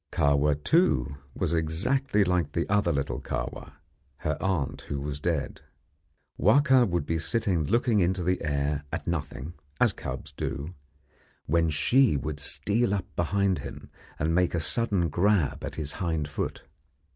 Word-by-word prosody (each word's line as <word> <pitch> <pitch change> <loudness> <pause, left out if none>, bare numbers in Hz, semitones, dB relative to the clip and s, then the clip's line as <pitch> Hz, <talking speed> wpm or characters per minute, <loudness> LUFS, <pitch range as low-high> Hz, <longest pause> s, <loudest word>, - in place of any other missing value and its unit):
Kahwa, 70 +1 +3
too, 70 - +2 0.2
was 80 - -1
exactly 100 - +2
like 90 -2 0
the - - -1
other 100 -4 +2
little 70 -3 -2
Kahwa, - - -5 0.5
her 75 -1 +1
aunt 90 -8 -1
who 70 - -2
was 70 +1 -4
dead. 80 -2 -2 0.8
Wahka 130 -5 +5
would 85 -4 -1
be 80 +1 -1
sitting 90 -2 0
looking 115 - +2
into 90 0 +1
the 90 +1 0
air 70 0 -1
at - - -4
nothing, 80 -1 -4 0.3
as - - +4
cubs 75 +4 -7
do, 75 +4 -4 0.7
when 80 +1 +2
she 110 - +3
would 75 +2 -4
steal 105 +8 0
up 95 - -3
behind 95 +2 +1
him - - -9 0.3
and 80 +2 0
make 90 0 +2
a - - +1
sudden 95 +1 0
grab 90 0 +1
at - - -5
his 75 -2 -3
hind 80 -4 -2
foot. 75 - -4
85 Hz, 150 wpm, -27 LUFS, 75-100 Hz, 0.8 s, Wahka